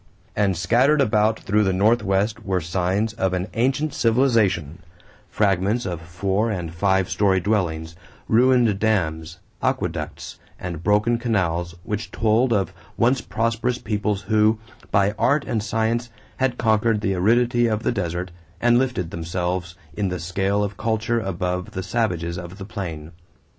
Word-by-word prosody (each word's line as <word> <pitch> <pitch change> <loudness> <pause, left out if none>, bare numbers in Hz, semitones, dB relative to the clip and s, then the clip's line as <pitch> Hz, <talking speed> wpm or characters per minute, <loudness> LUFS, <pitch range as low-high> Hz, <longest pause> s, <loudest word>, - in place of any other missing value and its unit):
And 100 -4 +1
scattered 125 - +3
about 110 -3 +2
through 105 +2 +2
the 95 -2 +1
Southwest 105 -1 +2
were 95 -1 0
signs 95 +6 -1
of 95 -3 -1
an 90 +1 -1
ancient 135 +5 0
civilization 110 - +2 0.5
fragments 100 +3 +1
of 85 -3 -4
four 95 +6 -1
and 90 -6 -4
five 95 +1 +2
story 95 -2 +2
dwellings, 85 -5 -1 0.3
ruined 120 -3 +4
dams, 85 -6 0 0.2
aqueducts, - - -3 0.2
and 85 -3 -5
broken 105 +4 +2
canals, 90 -7 -1
which 105 +4 -4
told 115 +3 +2
of 100 -3 +1 0.2
once 125 +3 +3
prosperous 115 +2 -1
peoples 105 -3 -2
who, 110 +2 +3 0.3
by 100 0 +3
art 145 +1 +2
and 115 -4 -1
science, 115 +3 -1 0.3
had 130 -2 0
conquered 110 -1 +2
the 95 - 0
aridity 120 +5 +3
of 110 0 -1
the - - +1
desert 90 -4 -3 0.3
and 120 +2 +4
lifted 125 -10 -1
themselves 85 +1 -3 0.2
in 95 +4 -1
the 90 0 -3
scale 95 +4 0
of 100 -1 -4
culture 110 +1 0
above 90 -2 -3
the 95 - -3
savages 90 -6 -1
of 85 +2 -9
the 95 - -7
plain. 85 -6 -6
100 Hz, 145 wpm, -23 LUFS, 90-115 Hz, 0.5 s, ruined